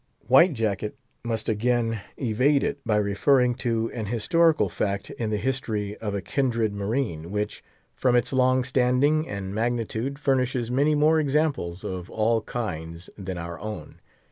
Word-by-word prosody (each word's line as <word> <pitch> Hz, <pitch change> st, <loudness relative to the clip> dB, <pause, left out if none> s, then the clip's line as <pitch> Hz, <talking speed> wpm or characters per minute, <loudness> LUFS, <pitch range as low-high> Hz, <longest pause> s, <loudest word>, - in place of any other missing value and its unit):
White 140 Hz, +8 st, +6 dB
Jacket 110 Hz, 0 st, -2 dB, 0.3 s
must 115 Hz, -2 st, -2 dB
again 115 Hz, 0 st, 0 dB, 0.2 s
evade 130 Hz, +4 st, +2 dB
it, 145 Hz, -, -2 dB
by 110 Hz, -3 st, +1 dB
referring 120 Hz, +5 st, +3 dB
to 115 Hz, -2 st, -1 dB
an 110 Hz, -4 st, -4 dB
historical 160 Hz, -, +3 dB
fact 100 Hz, -1 st, -2 dB
in 115 Hz, -2 st, -3 dB
the 105 Hz, -, 0 dB
history 105 Hz, -3 st, -2 dB
of 105 Hz, -2 st, -4 dB
a 100 Hz, -, -3 dB
kindred 115 Hz, -5 st, 0 dB
marine, 100 Hz, -, -2 dB
which, 105 Hz, +1 st, -3 dB, 0.3 s
from 125 Hz, -2 st, +2 dB
its 120 Hz, +2 st, +1 dB
long 130 Hz, 0 st, +3 dB
standing 130 Hz, +5 st, +2 dB
and 100 Hz, -1 st, -5 dB
magnitude, 120 Hz, +3 st, -2 dB
furnishes 130 Hz, -4 st, 0 dB
many 145 Hz, +4 st, +3 dB
more 155 Hz, +2 st, +4 dB
examples 140 Hz, -, 0 dB
of 90 Hz, -2 st, -5 dB
all 110 Hz, +1 st, +1 dB
kinds 85 Hz, -8 st, -5 dB
than 95 Hz, -2 st, -5 dB
our 85 Hz, 0 st, -6 dB
own. 110 Hz, 0 st, -7 dB
115 Hz, 150 wpm, -25 LUFS, 105-130 Hz, 0.3 s, White